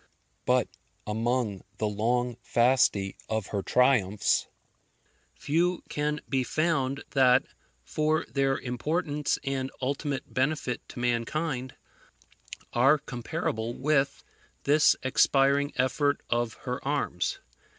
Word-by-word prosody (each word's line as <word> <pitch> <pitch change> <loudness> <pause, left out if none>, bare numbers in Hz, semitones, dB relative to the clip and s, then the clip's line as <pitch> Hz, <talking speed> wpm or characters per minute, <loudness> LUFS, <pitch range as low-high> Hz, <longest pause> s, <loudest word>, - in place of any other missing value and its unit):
But - - +3 0.4
among 110 -2 -1 0.2
the 110 - 0
long 120 +3 0
Fasti 120 -5 +2
of 110 -2 -1
her 100 - -1
triumphs, 110 -5 +2 0.9
few 170 +4 0
can 150 0 -1
be 135 -2 +1
found 140 -2 0
that, 130 -1 +4 0.4
for 155 +1 0
their 135 -1 +1
importance 150 +4 -1
and 135 -1 -2
ultimate 140 +1 -3
benefit 130 -2 0
to - - -8
mankind, 125 +3 -1 1.0
are 135 +5 +5
comparable 120 -4 -4
with 140 -1 +1 0.4
this 150 +2 +5
expiring 140 +2 +3
effort 145 +3 +1
of 120 -1 0
her 125 +1 -3
arms. 135 -11 -1
130 Hz, 100 wpm, -28 LUFS, 120-145 Hz, 1.0 s, are